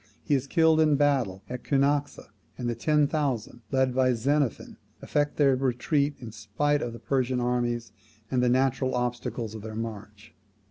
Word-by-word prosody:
He 150 - 0
in 135 - +3
killed 160 +3 +3
in 155 -2 +4
battle 135 -10 +1
at 125 0 -6
Cunaxa; 145 +1 0 0.3
and 125 - -3
the 120 - 0
ten 150 +6 +2
thousand, 135 -6 -2
led 130 -1 +1
by 130 0 +3
Xenophon, 140 +2 -1 0.2
effect 145 0 -1
their 140 -3 +4
retreat 135 +3 0
in 120 -3 -8
spite 115 +8 -1
of 120 - -4
the - - -8
Persian 130 0 0
armies 120 -2 -1 0.4
and 125 -2 +2
the 125 - +3
natural 130 0 +1
obstacles 120 -2 -3
of 110 - -7
their 110 0 -7
march. 105 -2 -7
130 Hz, 170 wpm, -27 LUFS, 120-145 Hz, 0.4 s, in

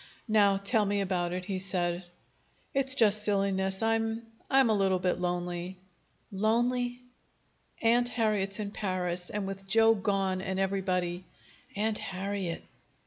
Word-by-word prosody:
"Now, 205 -3 +4
tell 210 +3 +2
me 205 0 0
about 180 -3 -1
it," 180 0 -4
he 195 -1 -3
said. 180 -2 0 0.7
"It's 270 -1 +3
just 215 -4 +4
silliness. 195 -1 0
I'm 225 0 0 0.3
I'm 265 -4 +4
a - - +3
little 195 -2 +2
bit 180 0 0
lonely." 175 +1 -3 0.5
"Lonely!" 245 +4 0 0.8
"Aunt 240 +2 +4
Harriet's 210 -4 0
in 205 -1 -3
Paris, 180 -3 -3
and 205 -1 -3
with 195 0 -6
Joe 225 +2 +5
gone 195 -3 0
and 190 0 -3
everybody 185 -2 -1 0.3
" - - -27
"Aunt 215 +1 0
Harriet!" 190 -2 -4
195 Hz, 140 wpm, -29 LUFS, 185-220 Hz, 0.8 s, Joe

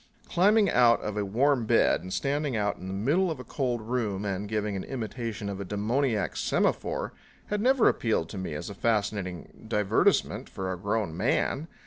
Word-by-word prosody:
Climbing 205 +4 +4
out 120 -7 +5
of 105 - -4
a 105 - 0
warm 120 +4 +1
bed - - +3
and 90 +1 -8
standing 140 +1 -1
out 105 -1 0
in 95 - -8
the - - -4
middle 150 - +2
of 155 -5 -4
a - - -6
cold 125 -2 -2
room 110 -4 -2
and 100 +1 -3
giving 105 -1 -1
an 95 - -3
imitation 115 -4 -4
of 100 -1 -4
a - - -2
demoniac 110 +3 0
semaphore - - 0 0.4
had 210 - 0
never 255 0 +4
appealed 110 -8 +1
to 100 - -6
me 90 -5 -4
as - - -5
a 100 - -6
fascinating 100 -4 -2
divertisement 105 -3 +1
for 95 -1 -4
a - - -2
grown 100 -2 -2
man. 150 - 0
110 Hz, 185 wpm, -28 LUFS, 100-130 Hz, 0.4 s, out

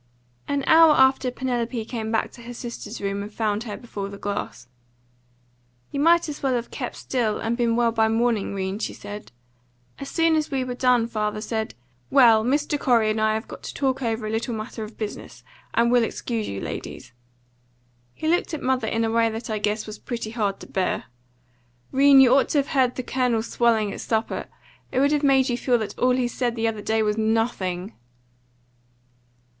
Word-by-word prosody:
An 285 -1 -1
hour 320 -1 +7
after 265 -1 +4
Penelope 245 -2 -2
came 220 -2 -4
back 225 - 0
to 240 - -14
her 240 +1 -9
sister's 235 0 -7
room 200 0 -2
and 205 +1 -7
found 215 0 -1
her 210 -3 -5
before 200 -5 -6
her 200 - -9
glass. 200 -11 -5 1.2
"You 280 - -3
might 335 +3 +4
as 300 -1 -6
well 265 -2 +1
have 235 -1 -3
kept - - -5
still, 230 -5 -1
and 225 +1 -1
been 235 -1 +1
well 235 -1 +3
by 225 -1 +2
morning, 225 -3 0
'Rene," 190 +1 -3
she - - -3
said. 205 -6 -9 0.7
"As 275 - -6
soon 330 -1 +2
as 310 -1 0
we 270 -3 -1
were 250 -1 -4
done 245 -2 +3
father 215 -2 -2
said, 220 0 -3 0.3
'Well, 235 -5 +6
Mr. 290 +4 0
Corey 230 -5 +3
and 215 0 -1
I 215 0 +2
have 220 +3 -4
got - - -10
to - - -8
talk 270 -1 0
over 225 -2 -1
a 215 - -3
little 225 +2 -2
matter 220 +1 -6
of 215 +1 -10
business, 215 -2 -7 0.3
and 235 +1 +3
we'll 245 -1 +4
excuse 225 -1 -3
you, 100 - -4
ladies.' 120 - -7 1.0
He 315 - -4
looked 340 0 +1
at 300 - -7
mother 255 -3 +1
in 225 +1 0
a 225 - -1
way 230 0 +3
that 225 +1 -5
I 215 - -1
guess 210 +1 -1
was 215 0 -8
pretty 230 -3 -5
hard 205 -4 -1
to - - -10
bear. 190 -1 -1 0.9
'Rene, 275 0 +7
you 250 -1 +5
ought 270 0 +4
to - - +1
have 280 - +1
heard 255 -2 +2
the 255 - -4
Colonel 245 -3 0
swelling 225 -3 +1
at - - -7
supper. 220 -1 -2 0.4
It 255 - 0
would 280 +2 +3
have 295 -1 +2
made 270 -2 +4
you 245 0 -1
feel 245 -2 +2
that 215 -3 -4
all 250 0 +3
he 250 -1 +1
said 240 0 -2
the 230 -1 0
other 215 -2 -3
day 220 +1 +1
was 210 +1 0
nothing." 220 -4 -1
230 Hz, 205 wpm, -24 LUFS, 215-255 Hz, 1.2 s, hour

